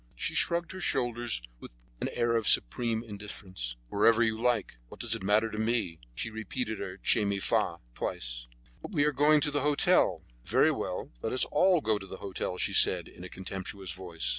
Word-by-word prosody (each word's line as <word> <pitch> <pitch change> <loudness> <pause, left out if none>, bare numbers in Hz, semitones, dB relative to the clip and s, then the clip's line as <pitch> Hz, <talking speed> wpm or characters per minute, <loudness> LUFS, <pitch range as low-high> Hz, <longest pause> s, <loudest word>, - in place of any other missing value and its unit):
She - - -2
shrugged 170 0 +1
her 190 - -7
shoulders 120 - -1 0.2
with - - -10 0.3
an - - -2
air 120 0 +1
of 115 -2 0
supreme 115 - +1
indifference. 100 - -7
"Wherever 115 - +4
you 110 -1 0
like; 120 - 0
what - - -13
does - - -1
it - - -2
matter 105 +3 +2
to 105 - -4
me?" 110 -7 0 0.2
She 110 - -3
repeated 110 +1 -4
her 95 -1 -5
"Che 110 - +2
mi 100 -1 0
fa" 95 - +1 0.2
twice. - - -4 0.3
"But - - -8
we 145 -4 +3
are 150 - +3
going 150 +2 +5
to 145 - +1
the 145 -1 0
hotel." 145 0 +3 0.2
"Very - - +3
well, - - -4
let 110 - -2
us 130 - +4
all 180 +2 +4
go 110 -4 +1
to 95 - -10
the 95 - -8
hotel," 95 -2 -4
she - - 0
said, - - +5
in 90 - -13
a 90 - -7
contemptuous 95 0 -6
voice. 85 -7 -4
110 Hz, 200 wpm, -30 LUFS, 95-120 Hz, 0.3 s, going